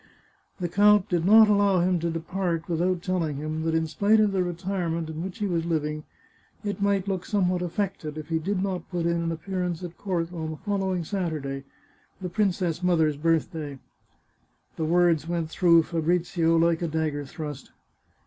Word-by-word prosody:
The 180 - -1
count 205 +2 +4
did 175 -2 +1
not 220 +2 +8
allow 200 -3 +3
him 180 0 +2
to 170 +1 -1
depart 165 0 -2
without 175 +1 0
telling 170 -5 -1
him 155 +2 -3
that 160 0 0
in 160 0 +2
spite 205 +7 +3
of 210 -1 +3
the 190 -2 +1
retirement 175 -2 -2
in 160 +1 -5
which 190 +1 -6
he 210 - -2
was 170 -4 0
living, 155 -2 -2 0.6
it 205 -1 -3
might 200 -1 +1
look 190 -2 -1
somewhat 185 -3 0
affected 180 -4 -3
if 155 0 -7
he 165 -1 +1
did 190 +3 -1
not 185 -4 -3
put 175 -2 -2
in 170 0 +1
an 165 0 -1
ap 160 0 -7
pearance 180 -3 -2
at 175 -1 -8
court 175 -3 -2
on 160 -2 -4
the 155 - -6
following 190 -3 -1
Saturday 155 -7 -3 0.3
— - - -36
the 185 -2 -4
princess 180 -4 0
mother's 160 -4 +2
birthday. 155 -2 -1 1.0
The 160 - -2
words 170 -1 +3
went 170 -2 -2
through 170 -2 +5
Fabrizio 165 0 +1
like 165 0 +2
a 170 - 0
dagger 155 -2 -1
thrust. 145 -1 -7
170 Hz, 185 wpm, -26 LUFS, 160-185 Hz, 1.0 s, not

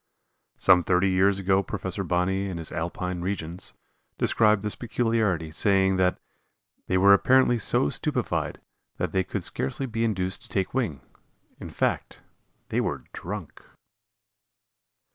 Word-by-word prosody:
Some 90 -2 +5
thirty 90 +2 +2
years 95 +1 +3
ago 95 0 +2
Prof. 95 -2 -5
Bonney 95 +3 0
in 90 - -5
his 80 -2 -5
"Alpine 85 +2 -3
Regions," 90 -2 -4 0.4
described 105 -2 +3
this 105 - -1
peculiarity, 110 -9 -1
saying 95 +2 +2
that 90 -1 +2 0.7
"they 95 - +1
were 100 +2 +7
apparently 125 +3 +4
so 95 - +2
stupefied - - -2 0.4
that - - -2
they 95 - +1
could - - -4
scarcely 65 - -2
be 115 -2 -2
induced 95 -5 -1
to - - -14
take 95 -2 -1
wing 110 - -1 0.6
in - - -8
fact, - - -2 0.5
they - - +1
were - - -3
drunk." 90 -2 -7
95 Hz, 135 wpm, -26 LUFS, 90-105 Hz, 0.7 s, were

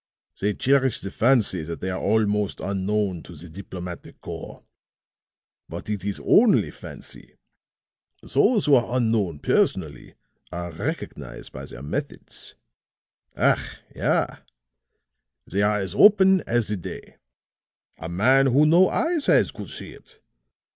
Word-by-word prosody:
They 105 +1 0
cherish 135 -2 +2
the 100 - -5
fancy 115 -8 +2
that 85 +1 -6
they 95 - -3
are 95 - -4
also 105 -1 0
unknown 100 -1 -1
to 85 - -12
the 80 +4 -11
diplomatic 90 0 -9
corps; - - -9 1.1
but - - -6
it 105 -3 -3
is 100 0 -3
only 230 0 +4
fancy. - - -11 0.9
Those 220 -6 +2
who 145 - +4
are 125 -1 +3
unknown 110 -9 0
personally 70 - -1 0.4
are 85 0 -5
recognized 80 - -6
by - - -8
their 60 - -10
methods. 70 - -5 0.8
Ach - - +1 0.2
ja! - - +2 1.2
They 100 +3 -1
are 105 +1 +2
as 95 -3 -3
open 190 -3 +6
as 120 -2 +1
the 105 - -1
day. 90 - -9 0.8
A 80 - -6
man 130 +10 +4
who 135 +4 +4
no 170 +4 +5
eyes 325 -3 0
has - - +4
could - - -9
see - - -7
it! - - -17
105 Hz, 135 wpm, -24 LUFS, 90-130 Hz, 1.2 s, open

